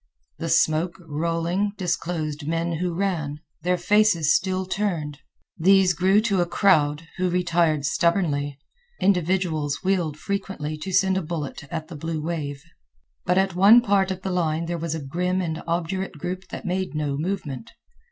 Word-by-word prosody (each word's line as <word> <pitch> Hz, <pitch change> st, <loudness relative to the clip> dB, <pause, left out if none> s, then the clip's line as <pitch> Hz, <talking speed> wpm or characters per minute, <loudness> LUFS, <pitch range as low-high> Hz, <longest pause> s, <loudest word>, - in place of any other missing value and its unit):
The -, -, -3 dB
smoke, 160 Hz, +3 st, +2 dB
rolling, 170 Hz, +6 st, -1 dB
disclosed 165 Hz, -4 st, -2 dB
men 165 Hz, +1 st, -1 dB
who 180 Hz, 0 st, -1 dB
ran, 165 Hz, -6 st, -1 dB, 0.2 s
their 180 Hz, +1 st, +1 dB
faces 175 Hz, -5 st, +3 dB
still 185 Hz, 0 st, 0 dB
turned. 170 Hz, -7 st, -2 dB, 0.4 s
These 190 Hz, +1 st, +5 dB
grew 190 Hz, +6 st, +3 dB
to 200 Hz, -5 st, +1 dB
a 175 Hz, -, 0 dB
crowd, 160 Hz, -5 st, +2 dB
who 185 Hz, 0 st, +1 dB
retired 170 Hz, -4 st, +1 dB
stubbornly. 145 Hz, -4 st, +1 dB, 0.4 s
Individuals 175 Hz, -6 st, +1 dB
wheeled 180 Hz, -6 st, 0 dB
frequently 190 Hz, -6 st, -3 dB
to 155 Hz, +5 st, -6 dB
send 190 Hz, 0 st, +3 dB
a -, -, 0 dB
bullet 155 Hz, -3 st, -5 dB
at 155 Hz, +3 st, -5 dB
the 170 Hz, -, -9 dB
blue 160 Hz, +2 st, -3 dB
wave. 150 Hz, -3 st, -4 dB, 0.6 s
But 180 Hz, +1 st, +2 dB
at 190 Hz, -1 st, +2 dB
one 200 Hz, +7 st, +7 dB
part 195 Hz, -4 st, +2 dB
of 190 Hz, 0 st, -4 dB
the 190 Hz, -, -2 dB
line 165 Hz, -2 st, 0 dB
there 170 Hz, 0 st, -3 dB
was 165 Hz, -1 st, -2 dB
a 155 Hz, -3 st, -6 dB
grim 180 Hz, +6 st, -1 dB
and 165 Hz, -3 st, -3 dB
obdurate 175 Hz, +1 st, -2 dB
group 180 Hz, +5 st, -5 dB
that -, -, -8 dB
made 185 Hz, -2 st, -2 dB
no 150 Hz, -2 st, -1 dB
movement. 145 Hz, -, -4 dB
170 Hz, 160 wpm, -24 LUFS, 155-190 Hz, 0.6 s, one